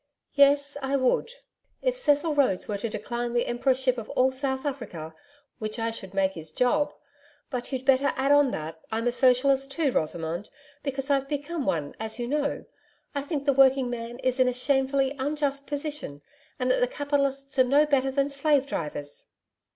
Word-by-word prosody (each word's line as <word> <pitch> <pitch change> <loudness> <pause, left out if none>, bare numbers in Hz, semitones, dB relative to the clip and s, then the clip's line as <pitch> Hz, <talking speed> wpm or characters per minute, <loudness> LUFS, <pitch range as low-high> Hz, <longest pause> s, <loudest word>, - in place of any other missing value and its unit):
'Yes, 285 0 +4
I 270 +1 -1
would 260 - +1 0.5
if - - +1
Cecil 305 -8 +2
Rhodes 260 -11 +1
were 205 -2 -3
to 230 - -3
decline 240 +2 -4
the 240 - +1
Emperorship 255 +1 +1
of 220 - -9
all 260 +1 +4
South 265 +1 -2
Africa 200 - -5 0.5
which 215 0 -4
I 230 0 -1
should 195 -4 -8
make 190 -1 +2
his 160 -4 -10
job.... 290 - +1 0.6
But 250 0 -4
you'd 260 -1 -3
better 270 +1 +4
add 270 +2 +1
on 290 -1 +5
that 160 -4 -6
I'm 225 +1 -1
a 245 - +3
Socialist 265 +2 +3
too, 285 -1 +1
Rosamond, 165 +1 -2 0.3
because 275 0 -2
I've 275 -1 +1
become 290 0 -3
one, 150 - -1
as 220 0 -5
you 240 -1 -3
know. 285 +1 -1 0.5
I 285 - -1
think 285 0 -4
the 280 - +4
working 265 -1 +4
man 235 0 -5
is 255 0 0
in 255 - +5
a 250 - +1
shamefully 270 +1 +1
unjust 280 0 -1
position, 290 - -4 0.3
and 255 -1 +1
that - - +2
the 250 - +3
capitalists 275 0 -1
are - - +8
no 280 +4 +4
better 275 -3 +2
than 275 +1 0
slave 280 0 +2
drivers.' 150 - -5
265 Hz, 180 wpm, -26 LUFS, 240-280 Hz, 0.6 s, are